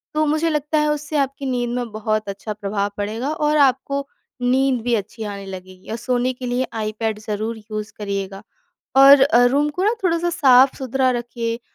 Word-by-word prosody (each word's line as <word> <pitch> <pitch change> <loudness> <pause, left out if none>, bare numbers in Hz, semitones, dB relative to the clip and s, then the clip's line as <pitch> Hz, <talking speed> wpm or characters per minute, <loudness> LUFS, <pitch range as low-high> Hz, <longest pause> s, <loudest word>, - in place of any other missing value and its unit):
तो 310 0 +2
मुझे 310 +2 +1
लगता 300 0 -1
है, 300 - +2
उससे 300 +1 -3
आपकी 275 0 -1
नींद 245 -1 -1
में 245 -2 -3
बहुत 215 0 -2
अच्छा 200 +2 -5
प्रभाव 200 0 -2
पड़ेगा। 220 +6 -3
और 300 0 +1
आपको 275 0 +1 0.3
नींद 255 0 +2
भी 240 -1 0
अच्छी 220 +2 -5
आने 200 -1 -6
लगेगी। 185 -1 -10
और 225 - -3
सोने 250 +1 0
के 250 0 -8
लिए 245 +1 -1
आई 215 0 -2
पैड 220 -2 -1
ज़रूर 215 +1 -4
यूज़ 215 0 -6
करिएगा। 195 -1 -4 0.6
और 275 0 +9
अ, 245 -3 +5
रूम 285 +4 +2
को 360 +6 -3
ना 430 +3 +3
थोड़ा-सा 345 -1 +1
साफ 265 -5 +5
सुथरा 260 0 0
रखिए। 235 -1 -3
245 Hz, 190 wpm, -21 LUFS, 215-275 Hz, 0.6 s, और